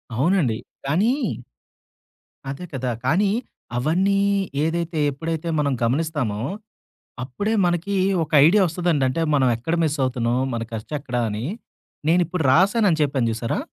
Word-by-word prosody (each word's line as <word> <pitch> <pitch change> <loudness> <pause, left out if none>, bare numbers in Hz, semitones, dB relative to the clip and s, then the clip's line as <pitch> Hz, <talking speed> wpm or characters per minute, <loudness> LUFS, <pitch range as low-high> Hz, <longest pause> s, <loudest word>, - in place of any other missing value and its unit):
అవునండి. 135 - +2 0.3
కానీ 195 - +2 1.4
అదే 140 +6 -5
కదా! 130 -1 -2
కానీ 195 +9 +2 0.5
అవన్నీ 185 +9 +2 0.4
ఏదైతే 165 0 -1
ఎప్పుడైతే, 160 +3 -4
మనం 140 -2 +1
గమనిస్తామో, 130 -4 0 0.9
అప్పుడే 205 - -2
మనకి 175 +3 -1 0.3
ఒక 150 - -16 0.2
ఐడియా 200 +4 +5
ఒస్తదండి. 170 -4 0
అంటే 145 +6 -2
మనం 130 -3 +3
ఎక్కడ 160 +9 -2
మిస్సవుతున్నాం 130 -5 0 0.2
మన 115 - -2
ఖర్చు 110 +6 -6
ఎక్కడ 125 -3 -5
అని, 105 +3 -4 0.6
నేను 175 +2 +4
ఇప్పుడు 175 0 -2
రాసానుని 190 - +3
చెప్పాను 135 -5 +1
చూసారా? 115 +1 -2
155 Hz, 120 wpm, -22 LUFS, 130-175 Hz, 1.4 s, ఐడియా